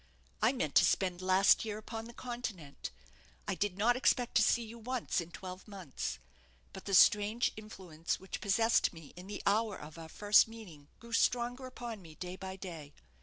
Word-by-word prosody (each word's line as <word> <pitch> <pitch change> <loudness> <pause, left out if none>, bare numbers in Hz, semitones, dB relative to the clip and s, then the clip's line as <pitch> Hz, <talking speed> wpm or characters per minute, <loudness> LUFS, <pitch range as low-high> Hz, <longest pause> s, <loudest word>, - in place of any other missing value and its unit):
I 220 - +5
meant 155 - -2
to - - +7
spend 185 -2 +1
last 185 +1 +5
year 215 -2 -4
upon 225 +1 -6
the 235 - -10
Continent. 225 - -6 0.6
I - - 0
did 200 -2 -2
not 235 +4 +3
expect 250 -1 +2
to - - +5
see 235 +2 +3
you 230 +1 -10
once 245 -4 -1
in 170 - -8
twelve 185 +1 -9
months; 190 -10 -5 0.6
but 190 - -9
the 195 - +1
strange 210 +5 +5
influence 185 -7 -5
which 190 - -7
possessed 225 +2 +3
me 165 -4 -12
in 180 +2 -10
the 205 0 -6
hour 210 0 +2
of 155 +2 -10
our 160 -1 -9
first 205 +6 +5
meeting 190 -11 -12
grew 235 0 -11
stronger 245 +2 +1
upon 235 -4 -7
me 160 -3 -13
day 180 +3 -6
by 190 0 -7
day. 165 -6 -8
205 Hz, 185 wpm, -33 LUFS, 180-230 Hz, 0.6 s, to